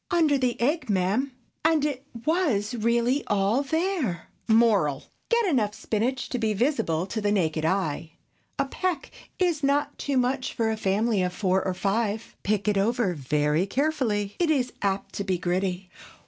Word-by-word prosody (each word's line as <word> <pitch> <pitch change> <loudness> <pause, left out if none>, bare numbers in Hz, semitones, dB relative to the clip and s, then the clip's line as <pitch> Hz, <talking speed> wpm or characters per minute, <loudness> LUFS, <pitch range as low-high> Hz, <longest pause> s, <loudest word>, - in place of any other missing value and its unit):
"Under 330 -6 +3
the 255 -3 0
egg, 285 +2 0
ma'am!" 205 +8 +1 0.3
And 315 -2 +3
it 285 -2 -3 0.2
was 285 - +1
really 235 +4 +1
all 205 +5 +2
there. 315 - -1 0.2
Moral.—Get 225 - +2
enough 225 - +1
spinach 245 +4 -1
to 250 - -2
be 220 -2 0
visible 195 - +1
to 215 +3 -4
the 205 0 +1
naked 160 -6 0
eye. 165 -3 -1 0.4
A - - +1
peck 340 +1 -3 0.3
is 345 -5 +1
not 285 +1 +1
too 280 -2 -1
much 255 +1 0
for 225 -1 +1
a - - 0
family 210 +1 +1
of 180 0 -1
four 190 0 +1
or 185 -1 -2
five. 210 +3 -1
Pick 210 0 -1
it 205 -2 +3
over 220 -2 +1
very 150 +4 0
carefully; 235 -7 0
it 345 -2 +2
is 255 -5 +1
apt 195 -1 -1
to 200 - -1
be 190 -2 0
gritty. 180 +1 -2
220 Hz, 160 wpm, -26 LUFS, 195-275 Hz, 0.4 s, Under